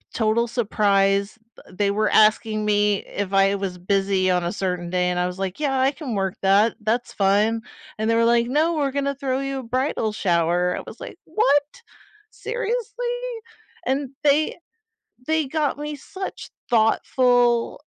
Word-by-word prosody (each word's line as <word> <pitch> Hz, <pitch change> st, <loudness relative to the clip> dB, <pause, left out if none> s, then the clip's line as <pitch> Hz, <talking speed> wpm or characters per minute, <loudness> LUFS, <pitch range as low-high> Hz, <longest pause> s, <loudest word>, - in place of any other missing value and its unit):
total 225 Hz, +1 st, +1 dB
surprise. 200 Hz, -2 st, +1 dB, 0.3 s
They 200 Hz, +2 st, 0 dB
were 210 Hz, +1 st, +1 dB
asking 215 Hz, 0 st, +3 dB
me 205 Hz, -1 st, +1 dB
if 200 Hz, -1 st, -5 dB
I 195 Hz, 0 st, +4 dB
was 190 Hz, -2 st, -4 dB
busy 195 Hz, 0 st, +1 dB
on 180 Hz, -1 st, +1 dB
a 170 Hz, -, -2 dB
certain 180 Hz, -3 st, -3 dB
day 180 Hz, 0 st, +1 dB
and 180 Hz, -, -1 dB
I 180 Hz, -, +1 dB
was 180 Hz, +1 st, -6 dB
like, 195 Hz, +5 st, -3 dB
"Yeah, 270 Hz, -3 st, 0 dB
I 265 Hz, +1 st, +3 dB
can 275 Hz, -6 st, -6 dB
work 195 Hz, -1 st, -1 dB
that, 200 Hz, +4 st, +3 dB
that's 230 Hz, +3 st, -1 dB
fine," 210 Hz, +3 st, +2 dB, 0.4 s
and 220 Hz, +1 st, -1 dB
they 230 Hz, -, +3 dB
were 230 Hz, -, +3 dB
like, 235 Hz, 0 st, +3 dB
"No, 310 Hz, +6 st, +1 dB
we're 285 Hz, -3 st, 0 dB
gonna 280 Hz, 0 st, -1 dB
throw 265 Hz, -1 st, -2 dB
you 275 Hz, 0 st, -3 dB
a -, -, -7 dB
bridal 250 Hz, -2 st, -1 dB
shower," 175 Hz, -2 st, +1 dB
I -, -, -4 dB
was -, -, -10 dB
like, -, -, -9 dB
"What? 290 Hz, -7 st, +1 dB, 0.5 s
Seriously?" 485 Hz, +1 st, -3 dB, 0.6 s
and 270 Hz, 0 st, -1 dB
they 295 Hz, +1 st, +2 dB, 0.7 s
they 315 Hz, 0 st, +1 dB
got 295 Hz, -1 st, -1 dB
me 300 Hz, 0 st, -4 dB
such 380 Hz, +7 st, -8 dB, 0.2 s
thoughtful, 240 Hz, +2 st, +2 dB
225 Hz, 165 wpm, -23 LUFS, 195-275 Hz, 0.7 s, I